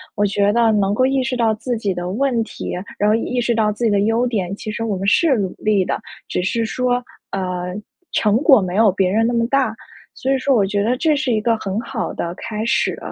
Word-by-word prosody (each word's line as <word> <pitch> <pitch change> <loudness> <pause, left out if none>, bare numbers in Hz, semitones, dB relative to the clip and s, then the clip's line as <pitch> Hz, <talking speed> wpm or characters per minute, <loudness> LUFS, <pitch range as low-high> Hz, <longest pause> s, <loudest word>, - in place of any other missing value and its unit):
我 205 - +2
觉 200 0 +2
得 230 -1 +4
能 200 -2 +1
够 255 +4 +2
意 270 0 +1
识 255 +1 -2
到 225 -2 +2
自 235 +2 -3
己 205 -4 -1
的 175 0 -4
问 235 +2 0
题， - - -6 0.2
然 210 - +2
后 215 - +4
意 245 +2 -1
识 235 0 +1
到 215 -2 +2
自 225 +3 -3
己 220 - +3
的 200 - +2
优 225 +4 +2
点， 200 -5 -2
其 215 - -6
实 230 - -4
我 215 -4 -1
们 195 +1 -3
是 290 +6 +4
努 190 -3 -2
力 205 -3 +1
的， - - -2 0.3
只 - - -1
是 225 +4 0
说， 250 +1 0 0.3
呃， 180 -1 -3 0.4
成 210 0 +2
果 265 -5 +5
没 185 -1 -3
有 215 -1 +5
别 190 0 +1
人 220 +4 +2
那 240 - 0
么 230 -1 +2
大， 260 -4 +1 0.4
所 265 - -2
以 270 - +1
说 265 0 +2
我 205 - +3
觉 200 +1 -1
得 245 +4 +1
这 310 +2 +2
是 280 -3 -1
一 220 - +2
个 230 +1 +2
很 200 0 -3
好 235 -1 -4
的 170 0 -4
开 220 +1 -5
始。 235 - +1
220 Hz, 270 characters per minute, -20 LUFS, 200-245 Hz, 0.4 s, 果